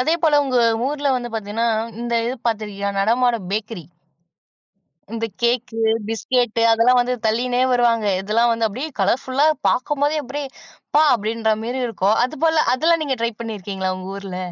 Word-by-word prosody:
அதேபோல, 315 Hz, +2 st, +2 dB
உங்க 255 Hz, -3 st, +1 dB, 0.3 s
ஊர்ல 290 Hz, 0 st, -1 dB
வந்து 245 Hz, -1 st, -3 dB
பார்த்தீங்கன்னா, 220 Hz, +1 st, -2 dB, 0.3 s
இந்த 240 Hz, 0 st, -2 dB
இது 245 Hz, -, -2 dB
பார்த்துருக்கியா 210 Hz, -3 st, -2 dB
நடமாடும் 230 Hz, -1 st, +1 dB
பேக்கரி, 210 Hz, -3 st, -4 dB, 1.3 s
இந்த 230 Hz, 0 st, -2 dB, 0.2 s
கேக்கு, 240 Hz, -1 st, 0 dB, 0.3 s
பிஸ்கேட்டு 230 Hz, 0 st, 0 dB
அதெல்லாம் 235 Hz, +2 st, +4 dB
வந்து 250 Hz, +1 st, -1 dB
தள்ளிகினே 245 Hz, +3 st, 0 dB
வருவாங்க. 235 Hz, -3 st, +2 dB
இதெல்லாம் 230 Hz, +4 st, +2 dB
வந்து 230 Hz, -1 st, 0 dB
அப்டியே 255 Hz, +9 st, -5 dB
கலர்ஃபுல்லா 260 Hz, +8 st, +1 dB, 0.2 s
பாக்கும்போதே 290 Hz, +3 st, 0 dB
அப்டியே 280 Hz, +2 st, -5 dB, 0.4 s
அப்பா! 300 Hz, +2 st, +5 dB
அப்டின்ற 220 Hz, 0 st, -1 dB
மேரி 255 Hz, +2 st, -3 dB
இருக்கும். 215 Hz, -1 st, +1 dB
அதுபோல 315 Hz, +3 st, +1 dB
அதெல்லாம் 330 Hz, +5 st, +2 dB
நீங்க 270 Hz, -3 st, -2 dB
ட்ரை 230 Hz, 0 st, 0 dB
பண்ணியிருக்கீங்களா? 195 Hz, -4 st, -4 dB
உங்க 185 Hz, 0 st, -8 dB
ஊர்ல. 195 Hz, -2 st, -7 dB
235 Hz, 140 wpm, -20 LUFS, 215-255 Hz, 1.3 s, அப்பா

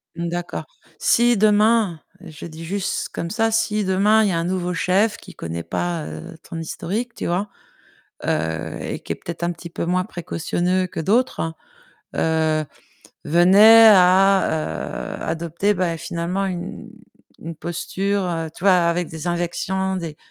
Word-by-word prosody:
D'accord. 170 Hz, +1 st, -4 dB, 0.3 s
Si 240 Hz, 0 st, +3 dB
demain, 210 Hz, -3 st, +3 dB, 0.2 s
je 160 Hz, -6 st, -10 dB
dis 165 Hz, 0 st, -9 dB
juste 195 Hz, +3 st, -2 dB
comme 170 Hz, -, -5 dB
ça, 225 Hz, +1 st, +1 dB
si 220 Hz, -1 st, +1 dB
demain 200 Hz, +3 st, +3 dB
il 205 Hz, -, +2 dB
y -, -, 0 dB
a 170 Hz, -, 0 dB
un 165 Hz, -, 0 dB
nouveau 180 Hz, 0 st, -2 dB
chef 195 Hz, +4 st, +2 dB
qui -, -, -13 dB
connaît 85 Hz, 0 st, -5 dB
pas, 170 Hz, -, -3 dB
heu, 175 Hz, -1 st, -8 dB
ton 165 Hz, -, -6 dB
historique, 210 Hz, +8 st, -4 dB
tu -, -, -5 dB
vois? 185 Hz, +4 st, -1 dB, 0.8 s
Heu, -, -, -2 dB
et -, -, -5 dB
qui -, -, -5 dB
est -, -, -5 dB
peut-être 170 Hz, 0 st, -8 dB
un 170 Hz, -, +1 dB
petit 170 Hz, 0 st, -8 dB
peu 170 Hz, -, -4 dB
moins 180 Hz, +1 st, +1 dB
précautionneux 180 Hz, 0 st, -1 dB
que 175 Hz, -, -6 dB
d'autres, 195 Hz, -3 st, +1 dB, 0.6 s
heu, 160 Hz, -1 st, +1 dB, 0.6 s
venait 200 Hz, +8 st, +7 dB
à, 185 Hz, -4 st, +2 dB
heu, -, -, -5 dB
adopter, 170 Hz, +5 st, -1 dB
bah, 180 Hz, -3 st, -1 dB
finalement, 175 Hz, +4 st, -2 dB
une 175 Hz, -2 st, -6 dB, 0.5 s
une 165 Hz, +1 st, -6 dB
posture, 175 Hz, +1 st, -2 dB
tu 175 Hz, -, -11 dB
vois? 195 Hz, -, +7 dB
Avec 175 Hz, -1 st, +2 dB
des 160 Hz, +2 st, -6 dB
injections, 175 Hz, +2 st, -1 dB
des 165 Hz, -4 st, -6 dB
180 Hz, 155 wpm, -21 LUFS, 170-200 Hz, 0.8 s, venait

